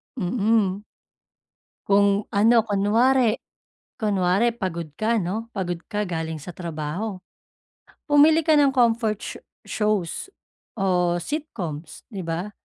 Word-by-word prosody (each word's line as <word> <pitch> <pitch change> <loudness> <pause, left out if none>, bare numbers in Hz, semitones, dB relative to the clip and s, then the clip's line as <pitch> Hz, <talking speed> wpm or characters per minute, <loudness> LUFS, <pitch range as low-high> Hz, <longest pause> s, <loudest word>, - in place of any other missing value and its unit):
Mm. 205 -1 +1 1.0
Kung 200 0 +3
ano, 225 +3 +5
kunwari, 225 +4 +3 0.6
kunwari 205 +1 +1
pagod 170 -8 -4
ka 225 +6 0
'no, 215 +5 -3
pagod 175 -3 -2
ka 210 -1 -1
galing 160 -2 -3
sa 170 +4 -9
trabaho, 170 +4 -4 0.9
pumili 305 +1 +5
ka 315 - +4
ng 290 -2 +5
comfort 230 -3 +2
sho - - -6 0.3
shows 210 - -1 0.5
o 180 -3 +1
sitcoms, 175 - -5
di 195 -2 -5
ba? 170 +4 -4
205 Hz, 110 wpm, -24 LUFS, 180-230 Hz, 1.0 s, ano